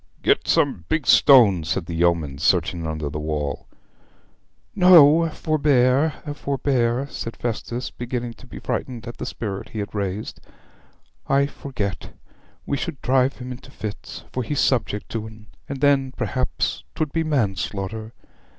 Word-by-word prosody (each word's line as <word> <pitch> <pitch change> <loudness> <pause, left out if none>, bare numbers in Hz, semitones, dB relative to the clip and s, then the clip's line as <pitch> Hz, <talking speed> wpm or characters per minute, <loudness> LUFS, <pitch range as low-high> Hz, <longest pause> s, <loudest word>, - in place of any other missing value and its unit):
'Get - - +2
some 85 - +2
big 155 -3 0
stones,' 100 - +6
said 95 -2 -1
the 85 - -6
yeomen, 80 -5 +1
searching 85 0 +1
under 80 -1 -3
the 75 +1 -4
wall. 75 -2 -3 1.1
'No; 170 -4 +7
forbear, 145 -2 +2 0.2
forbear,' 135 -3 0
said 115 -3 -6
Festus, 120 +1 -4
beginning 120 -1 -4
to 130 - -17
be - - -10
frightened 120 -3 -4
at 120 - -7
the - - -5
spirit 100 -3 -5
he - - -8
had 105 -1 -4
raised. 100 0 -4 0.9
'I 140 +1 +3
forget; 125 -8 -5 0.5
we 140 - -1
should 140 - -4
drive 130 +1 +3
him 125 0 -7
into 125 - -10
fits, 105 -2 -7
for 130 - -1
he's 145 +4 -2
subject 115 -5 +1
to 110 -1 -4
'em, 110 0 -14 0.2
and 140 -2 -5
then 135 -2 +3
perhaps 130 0 -2
'twould 155 -2 -1
be 165 - +1
manslaughter. 110 - -2
120 Hz, 145 wpm, -23 LUFS, 100-140 Hz, 1.1 s, No